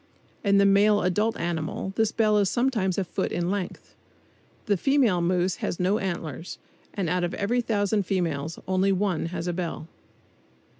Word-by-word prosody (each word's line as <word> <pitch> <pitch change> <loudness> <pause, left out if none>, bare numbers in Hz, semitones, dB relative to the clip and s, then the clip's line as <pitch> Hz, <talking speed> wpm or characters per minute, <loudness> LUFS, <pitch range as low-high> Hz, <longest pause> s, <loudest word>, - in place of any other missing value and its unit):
In 200 -2 +4
the 200 - +5 0.4
adult 210 +5 +1
male - - -5
animal 170 +3 -3
this 220 -1 +2
bell 215 -2 +3
is 200 -2 +2
sometimes 235 -7 0
a 195 - +1
foot 180 - -3
in 175 +1 -1
length 200 -3 -5 0.7
The 205 - +2
female 240 -4 +2
moose 180 +1 +1
has - - -3
no 190 +4 +2
antlers, 170 -4 -4 0.3
and 195 -4 -2
out 180 +2 0
of 175 - -2
every 235 +5 0
thousand 205 -3 0
females 165 -5 -1
only 190 +1 +2
one 190 -4 0
has 170 -1 -4
a 175 - -1
bell. 170 -2 -4
190 Hz, 165 wpm, -26 LUFS, 175-205 Hz, 0.7 s, the